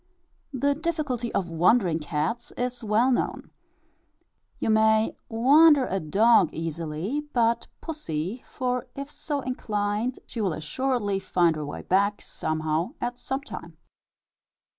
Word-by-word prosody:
The 285 +1 +1
difficulty 290 -7 -2
of 180 -4 -1
"wandering" 175 0 +3
cats 155 +10 -2
is 245 0 -3
well 220 +4 +3
known. 245 - -1 1.1
You - - 0
may 220 0 +3
"wander" 280 +5 +6
a 195 - -1
dog 195 +3 +4
easily; 165 - -3
but - - -5
not 230 +1 +1
pussy, 225 - -4
for 250 0 -3
if 280 +1 -6
so 290 -2 -3
inclined, 215 -1 -2
she 235 - -5
will 190 -5 +1
assuredly 205 - -1
find 175 -3 +2
her 150 -1 -4
way - - -6
back 200 +2 +2
somehow 155 +2 -2
at 245 0 -3
some 265 +2 -3
time. - - -9
220 Hz, 130 wpm, -26 LUFS, 175-255 Hz, 1.1 s, wander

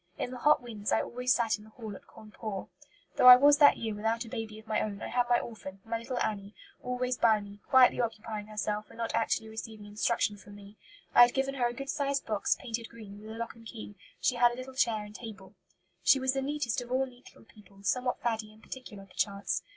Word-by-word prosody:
In 245 - -3
the 255 - -7
hot 295 -1 +4
winds 215 -4 -4
I - - +3
always 250 +1 -1
sat 225 -2 +2
in - - -14
the 220 - -15
hall 220 -2 -8
at - - -14
Cawnpore. 215 -2 -7 0.5
Though - - +6
I 250 - +14
was 285 +3 +5
that 290 -1 +7
year 220 -2 -3
without 225 +3 -1
a - - -10
baby 225 -2 -5
of 220 - -13
my 220 -1 0
own, 205 -2 -3
I - - -5
had 245 -1 +1
my 240 - +5
orphan, 195 -4 -8
my 225 0 -2
little 245 +2 -5
Annie, 205 -1 -3 0.3
always 250 0 -2
by 220 -2 +5
me, 205 0 -11
quietly 255 -2 +6
occupying 215 -2 -4
herself 210 0 -3
when - - -15
not 230 -1 -3
actually 225 -1 0
receiving 220 -1 -8
instruction 205 0 0
from 205 0 -14
me. 205 0 -13 0.4
I - - +8
had 240 0 +7
given 270 0 0
her 250 -3 +1
a 240 - -4
good 275 +2 -6
sized 280 -1 -1
box, 215 -2 0
painted 230 -2 -5
green, 210 -3 -11
with 215 - -10
a 220 - -7
lock 230 0 -4
and 230 - -16
key; 215 -2 -8 0.3
she 250 - +1
had 240 0 +5
a - - -6
little 255 +1 -8
chair 225 -5 +1
and 210 - -12
table. 210 -4 -10 0.5
"She 275 - +5
was 260 0 +1
the 270 - -1
neatest 270 -3 -1
of 245 0 -9
all 260 +1 +2
neat 250 -1 -16
little - - -17
people, 200 -2 -19
somewhat 250 +6 0
faddy 220 -2 -1
and 215 +1 -20
particular, 210 -7 -9
perchance. 195 -1 -2
225 Hz, 240 wpm, -30 LUFS, 210-250 Hz, 0.5 s, I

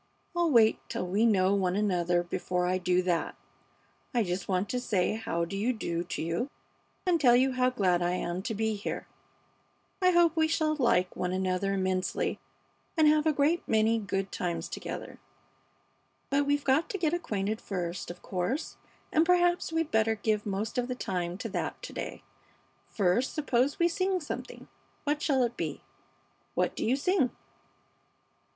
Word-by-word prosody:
"I'll 345 -1 +2
wait 230 -6 +5
till - - -2
we 200 +6 +2
know 190 -3 +3
one 185 -2 +1
another 175 -4 +1
before 180 +1 -2
I 185 +1 +1
do 180 0 +2
that. 175 -2 0 0.8
I 235 - +4
just 180 0 -3
want 185 +1 0
to 250 - -1
say 205 -7 +1
how 170 -6 -2
do 195 - -6
you 225 +6 +1
do 170 -6 -2
to 175 - -4
you, 170 - -1 0.6
and 345 -4 +2
tell 245 -3 +6
you 260 +2 +4
how 255 0 +2
glad 185 -8 +1
I 175 0 +1
am 180 0 -2
to 220 +2 -3
be 220 +1 0
here. 205 -1 -4 1.0
I 365 - +5
hope 345 -2 +4
we 320 -1 +3
shall 315 -1 +1
like 185 -10 +2
one 180 0 -2
another 185 +1 0
immensely 185 -1 -1 0.6
and 315 -1 +6
have 305 +1 +4
a - - +5
great 300 +4 +2
many 220 +1 +3
good 195 -2 -2
times 175 -1 -2
together. - - -6 1.1
But 280 +1 +2
we've 290 0 +1
got 275 +5 +2
to 395 - -2
get 330 -3 0
acquainted 215 - -2
first, 180 -2 -4
of 175 0 -9
course, 190 - -2 0.3
and 315 - +4
perhaps 350 0 +3
we'd 325 -1 -1
better 220 0 +3
give 210 0 -1
most 205 +4 -2
of 245 - -1
the 250 - -3
time 180 -6 -3
to - - -5
that - - -3
to - - -7
day. - - -6 0.6
First, 210 +5 +1
suppose 275 -2 +1
we 340 - +4
sing 370 +2 0
something. 300 - -7 0.4
What 295 +1 0
shall 270 -5 +2
it 240 0 -1
be? - - -4 0.7
What - - +1
do - - -3
you 245 - +2
sing?" 285 -2 +2
220 Hz, 175 wpm, -29 LUFS, 185-290 Hz, 1.1 s, tell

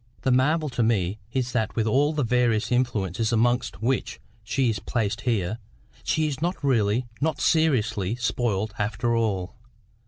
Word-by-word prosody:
The 130 - +2
marvel 150 +5 +2
to 125 -2 -2
me 110 -3 +1
is 125 -1 -1
that 110 -3 -1
with 110 - +1
all 140 +7 +3
the 150 -2 -1
various 120 -2 +1
influences 110 -4 0
amongst 120 -1 +1
which 130 +2 -1 0.2
she 125 +5 0
is 110 -3 0
placed 110 -1 -2
here, 110 -1 -1 0.4
she 155 - +1
is 145 -1 -4
not 175 +3 0
really, 120 -3 +2 0.2
not 155 -1 0
seriously, 115 - +1
spoiled 115 -3 -1
after 115 +3 0
all. 100 -5 -1
120 Hz, 155 wpm, -25 LUFS, 110-130 Hz, 0.4 s, all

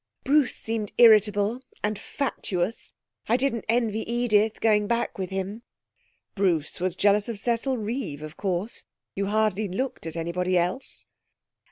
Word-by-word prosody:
Bruce 285 -1 +3
seemed 225 -2 -3
irritable, 215 0 +5 0.2
and 210 0 -1
fatuous. 210 -8 -3 0.4
I 235 - +4
didn't 255 -3 -1
envy 225 -2 +1
Edith 220 -3 +2
going 210 -2 +3
back 235 -2 -1
with 185 -2 -2
him.' 195 +3 -4 0.7
'Bruce 175 -7 0
was 180 0 -1
jealous 205 +3 +3
of 230 - -3
Cecil 240 +4 0
Reeve, 215 - -4
of 155 +1 -8
course. 195 +3 -3 0.3
You 195 0 -2
hardly 215 0 +1
looked 195 -1 -3
at 160 - -6
anybody 180 +2 0
else.' 180 +10 -2
210 Hz, 140 wpm, -26 LUFS, 185-235 Hz, 0.7 s, irritable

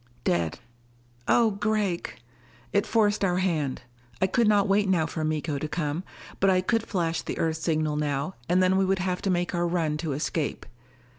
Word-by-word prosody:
"Dead." 85 -3 0 0.7
"Oh 230 -2 +4
Gregg 200 - -1 0.3
" 120 0 -28
It 200 - +2
forced 210 -2 +2
our 180 -2 +2
hand. 160 -8 -1 0.4
I - - +3
could 230 +4 +2
not 205 -1 +4
wait 200 0 +2
now 170 -4 +3
for 160 0 -4
Miko 155 -1 -1
to 155 - -3
come. 150 +1 -2 0.4
But 195 - +4
I 185 -1 +4
could 225 +4 0
flash 165 -4 -1
the - - -5
Earth 160 -1 0
signal 155 -2 0
now, 145 +3 -1 0.2
and 180 +1 +4
then 185 +1 +3
we 195 - +3
would 190 +1 +1
have 180 0 -2
to 195 - -1
make 175 -1 0
our 175 0 +1
run 165 -3 0
to 150 -2 -3
escape. 150 +1 -2
175 Hz, 195 wpm, -26 LUFS, 155-195 Hz, 0.7 s, Oh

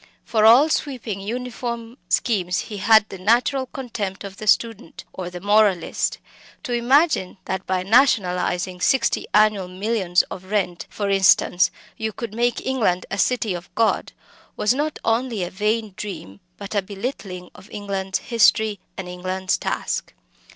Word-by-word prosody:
For 220 -2 +2
all 245 +7 +8
sweeping 245 -10 -2
uniform 235 +1 -5
schemes 185 -7 +1
he 210 - -7
had 220 +2 +5
the 195 - -8
natural 245 +6 +2
contempt 225 -9 -5
of 195 -1 -8
the 215 - -7
student 215 -3 0
or 180 -2 -5
the 180 0 -8
moralist. 205 -3 +2 0.5
To 250 -5 -3
imagine 245 - +2
that 190 0 -4
by 185 -1 0
nationalising 185 -6 +2
sixty 265 +1 +2
annual 210 -3 +3
millions 185 -1 +1
of 185 - -9
rent 190 -3 -2
for 205 - -3
instance 190 -1 +4 0.3
you 220 -1 -3
could 230 -2 -6
make 240 +2 0
England 220 -9 0
a 195 - -3
city 225 -1 +1
of 175 +1 -7
God, 225 -1 +1 0.5
was 210 - +2
not 295 +3 -2
only 225 -3 0
a 175 - -5
vain 210 +1 -1
dream, 100 - -7 0.2
but 200 0 -7
a 205 - +2
belittling 195 -3 -6
of 190 - -15
England's 195 -2 -3
history 220 -3 +2 0.2
and 190 - -5
England's 185 +1 -2
task. - - -3
210 Hz, 150 wpm, -22 LUFS, 185-235 Hz, 0.5 s, all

